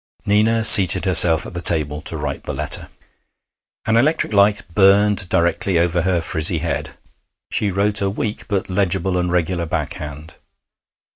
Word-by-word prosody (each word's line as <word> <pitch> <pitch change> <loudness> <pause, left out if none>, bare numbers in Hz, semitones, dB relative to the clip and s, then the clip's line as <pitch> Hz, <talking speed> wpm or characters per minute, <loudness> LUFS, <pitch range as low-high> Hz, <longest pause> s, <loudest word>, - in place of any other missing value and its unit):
Nina 110 +2 0
seated 100 -4 +8
herself 85 -3 +3
at - - -11
the 85 - -5
table 75 -3 0
to 80 - -5
write 75 -2 -7
the - - -6
letter. - - -2 1.0
An 110 +1 0
electric 145 -2 -1
light 100 +1 +1
burned 100 0 +2
directly 85 +2 -1
over 85 +1 -1
her 90 0 -2
frizzy 80 +1 +2
head. 85 +1 -6 0.5
She 105 - -1
wrote 100 +2 0
a 100 - -1
weak 105 +1 -6
but 100 -3 -4
legible 95 -1 -2
and 90 -1 -3
regular 85 -1 -3
back - - -5
hand. 75 +1 -11
90 Hz, 155 wpm, -17 LUFS, 85-100 Hz, 1.0 s, seated